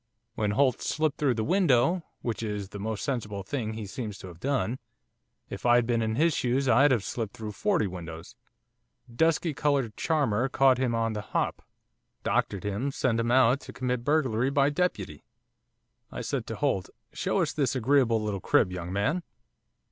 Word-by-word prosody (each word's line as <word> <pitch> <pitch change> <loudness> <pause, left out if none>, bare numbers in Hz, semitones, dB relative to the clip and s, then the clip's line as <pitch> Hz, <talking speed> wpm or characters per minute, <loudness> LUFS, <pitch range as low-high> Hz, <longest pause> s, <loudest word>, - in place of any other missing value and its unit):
When 105 -3 -1
Holt 130 -4 +3
slipped 155 -2 -1
through 135 -5 +2
the 110 - -1
window 170 - +3 0.2
which 115 -2 -2
is 105 -3 -4
the 100 - -8
most 110 +1 -3
sensible 105 -7 -3
thing 115 -5 -3
he 110 -1 -5
seems 105 -1 -6
to 95 - -9
have 85 -2 -13
done; 130 +1 -1 0.7
if - - -8
I'd 120 -1 +4
been 115 -1 +1
in 110 0 -1
his 160 +3 +3
shoes 130 +2 0
I'd 135 +4 +5
have 120 -7 +2
slipped 110 +3 -4
through 110 -2 -5
forty 185 - +1
windows! 85 -3 -8 0.8
dusky 160 +2 +2
coloured 140 -6 0
charmer 135 -6 +1
caught 130 -1 +4
him 125 -3 +1
on 115 -1 0
the 105 - -3
hop, 110 - -2 0.6
doctored 100 - 0
him 105 +7 -2
sent 125 -4 0
him 115 0 0
out 130 +1 +4
to - - -11
commit 125 -1 -2
burglary 130 -4 +1
by 140 0 +3
deputy. 110 - -2 0.9
I - - -5
said - - -3
to - - -4
Holt, 95 - 0 0.2
"Show - - -1
us - - 0
this 140 -2 0
agreeable 125 -2 +3
little 105 -3 -3
crib, 90 - +3
young 90 -1 -5
man." 105 - 0
120 Hz, 180 wpm, -28 LUFS, 105-140 Hz, 0.9 s, I'd